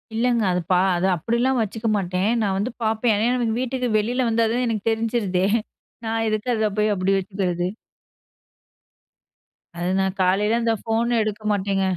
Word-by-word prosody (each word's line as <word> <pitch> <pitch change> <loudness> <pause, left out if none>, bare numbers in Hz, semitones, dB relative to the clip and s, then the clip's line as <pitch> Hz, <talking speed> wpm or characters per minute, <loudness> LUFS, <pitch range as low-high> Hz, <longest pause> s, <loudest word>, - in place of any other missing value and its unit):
இல்லங்க. 235 0 +2
அது 180 0 0
பா 180 - +5 0.2
அது 175 - 0
அப்டில்லாம் 235 +8 0
வச்சுக்க 225 +1 -3
மாட்டேன். 185 0 -1
நான் 200 -3 0
வந்து 210 +6 -1
பார்ப்பேன். 220 +1 +1
ஏன்னா, 220 +3 +1
எனக்கு 230 -2 0
வீட்டுக்கு 255 -1 -2
வெளில 245 +4 0
வந்தா 230 0 +2
தான் 250 +1 0
எனக்கு 220 -2 -2
தெரிஞ்சிருதே! 220 -5 0 0.6
நான் 225 0 -1
எதுக்கு 215 +3 -2
அத 215 -1 +1
போய் 210 0 +2
அப்டி 190 +1 +1
வச்சுக்கிறது? 185 -2 -2 2.1
அது 175 +1 -2
நான் 190 0 0
காலையில 205 +5 +2
அந்த 230 -1 +2
ஃபோன் 230 +2 0
எடுக்க 215 0 -3
மாட்டேங்க. 195 -1 0
215 Hz, 155 wpm, -22 LUFS, 195-230 Hz, 2.1 s, பா